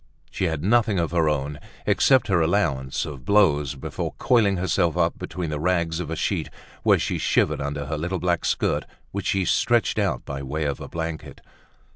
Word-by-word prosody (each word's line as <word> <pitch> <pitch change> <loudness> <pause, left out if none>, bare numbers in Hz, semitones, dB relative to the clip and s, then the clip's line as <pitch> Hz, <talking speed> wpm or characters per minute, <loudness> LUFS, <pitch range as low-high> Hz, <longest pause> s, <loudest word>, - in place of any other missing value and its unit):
She 95 - -1
had 80 -3 -2
nothing 110 0 +3
of 85 -2 0
her 85 -3 +2
own, 75 0 -2 0.3
excepting 130 -7 +3
her 85 - +4
allowance 80 -7 0
of 70 -4 -8
blows, 75 -8 +3
before 65 - -5
coiling 105 -6 +3
herself 90 -2 +1
up 85 -1 +1
between 85 -3 -4
the 75 - -2
rags 85 -1 0
of 85 -4 -4
a 80 - -2
sheet, - - -1 0.3
where - - +4
she - - -2
shivered - - +1
under 70 0 -3
her 75 +2 -3
little 90 +4 -2
black 85 -1 0
skirt, - - 0 0.3
which 100 0 -4
she 95 -1 +1
stretched - - +2
out - - -1
by 70 0 -5
way 75 +4 -3
of 70 -2 -2
a - - -6
blanket. 80 -1 -5
85 Hz, 190 wpm, -24 LUFS, 75-95 Hz, 0.3 s, her